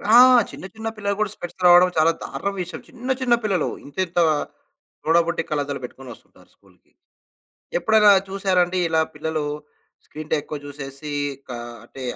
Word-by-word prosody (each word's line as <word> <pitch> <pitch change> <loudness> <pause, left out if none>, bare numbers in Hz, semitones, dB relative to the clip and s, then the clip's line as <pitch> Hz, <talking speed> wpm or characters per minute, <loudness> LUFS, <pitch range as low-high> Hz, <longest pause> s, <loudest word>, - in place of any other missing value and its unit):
ఆ! - - +10 0.3
చిన్న - - -9
చిన్న 220 0 -6
పిల్లలకు 200 -1 -2
కూడా 210 -2 0
స్పెక్స్ 175 +1 -8
రావడం 180 +1 +7
చాలా 160 +1 +5
దారుణం 200 - -4
విషయం. 180 0 -6
చిన్న 255 0 -4
చిన్న 250 -2 +3
పిల్లలు 190 -6 0 0.2
ఇంత 145 - -14
ఇంత 175 +1 -2 0.8
సొడబుట్టి 170 +1 +2
కళ్లద్దాలు 145 -2 -2
పెట్టుకొని 130 +1 -9
ఒస్తుంటారు - - -21
స్కూల్‌కి. - - -28 0.9
ఎప్పుడైనా 215 +2 +5 0.2
చూసారా 190 -1 +1
అండి, 180 +1 -3
ఇలా 160 0 +2
పిల్లలు 155 0 -3 0.6
స్క్రీన్‌టైమ్ 155 0 -3
ఎక్కువ 150 0 -6
చూసేసి 140 +1 -8 0.4
క - - -11 0.3
అంటే 130 +2 -11
170 Hz, 150 wpm, -22 LUFS, 150-195 Hz, 0.9 s, ఆ